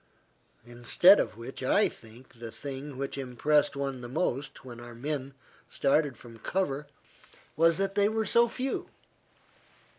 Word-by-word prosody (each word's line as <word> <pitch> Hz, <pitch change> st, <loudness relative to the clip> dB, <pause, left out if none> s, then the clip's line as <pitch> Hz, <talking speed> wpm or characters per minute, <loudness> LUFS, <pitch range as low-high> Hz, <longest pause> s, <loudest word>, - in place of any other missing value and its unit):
Instead 120 Hz, +11 st, +5 dB
of -, -, -2 dB
which 120 Hz, +4 st, -8 dB
I 165 Hz, +11 st, +4 dB
think 115 Hz, +2 st, -14 dB
the 115 Hz, -1 st, -7 dB
thing 135 Hz, +3 st, -7 dB
which 140 Hz, +1 st, -4 dB
impressed 140 Hz, +3 st, +1 dB
one 135 Hz, -2 st, -3 dB
the 120 Hz, -, -7 dB
most, 135 Hz, -2 st, -2 dB
when 120 Hz, -2 st, -9 dB
our 120 Hz, 0 st, -10 dB
men 135 Hz, +1 st, -4 dB, 0.3 s
started 140 Hz, -2 st, +1 dB
from 115 Hz, -1 st, -13 dB
cover, 150 Hz, -, -2 dB, 0.7 s
was 165 Hz, +1 st, +4 dB
that 195 Hz, 0 st, 0 dB
they 205 Hz, 0 st, +3 dB
were 220 Hz, 0 st, -1 dB
so 235 Hz, +4 st, +4 dB
few. 260 Hz, +3 st, -3 dB
135 Hz, 145 wpm, -29 LUFS, 120-165 Hz, 0.7 s, Instead